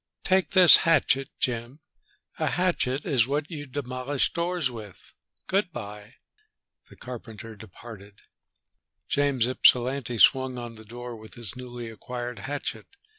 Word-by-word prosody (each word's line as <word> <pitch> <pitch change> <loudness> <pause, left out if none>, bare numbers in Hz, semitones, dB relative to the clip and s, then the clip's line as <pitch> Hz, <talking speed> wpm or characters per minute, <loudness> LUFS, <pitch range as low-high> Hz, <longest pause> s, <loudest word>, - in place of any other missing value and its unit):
"Take 190 -2 +2
this 185 -3 +9
hatchet, 135 -5 +2
Jim. 120 +3 -2 0.6
A - - +1
hatchet 155 -7 0
is 130 -7 +2
what 145 +4 -2
you 145 -3 -6
demolish 130 0 -2
doors 170 -5 -1
with! 110 -5 -11 0.3
Good 190 -1 0
by." 105 -4 -8 0.7
The - - -14
carpenter 115 -3 -9
departed. 105 0 -12 0.9
James 140 -4 +2
Ypsilanti 125 0 +3
swung 130 +2 +4
on 120 -1 -6
the 110 -1 -13
door 120 +2 -8
with 110 0 -13
his 120 -2 -7
newly 120 -2 -7
acquired 120 +2 -6
hatchet. 135 -6 -5
125 Hz, 125 wpm, -26 LUFS, 115-145 Hz, 0.9 s, this